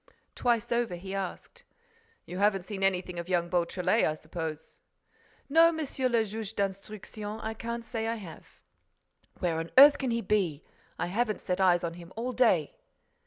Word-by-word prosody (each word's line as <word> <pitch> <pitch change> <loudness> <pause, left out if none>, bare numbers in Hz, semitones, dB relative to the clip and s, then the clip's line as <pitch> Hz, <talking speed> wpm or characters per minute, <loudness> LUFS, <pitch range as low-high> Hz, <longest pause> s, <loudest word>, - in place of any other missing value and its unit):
Twice 235 -2 0
over, 235 -6 0
he 190 +2 -7
asked: 195 - -6 0.6
"You 180 - -6
haven't 200 -2 +2
seen 200 -2 -6
anything 180 -2 0
of 170 +1 -6
young 175 -2 +1
Beautrelet, 180 +4 +1
I 155 - +2
suppose?" 155 0 -7 0.7
"No, 330 +3 +6
Monsieur 280 -5 -1
le 230 -2 +2
Juge 220 0 -6
d'Instruction, 205 +2 -4
I 220 - -4
can't 235 +1 -5
say 225 -1 -3
I 230 - -1
have." 190 -8 -11 0.8
"Where 170 -3 0
on 165 +1 -4
earth 285 +2 +9
can 265 - -1
he 230 0 0
be? 185 -8 0 0.3
I - - -1
haven't 215 +4 -1
set 180 +1 -1
eyes 180 -2 +4
on 170 -1 -2
him 170 +1 -12
all 240 +3 -2
day!" 250 - +2
205 Hz, 165 wpm, -29 LUFS, 180-230 Hz, 0.8 s, earth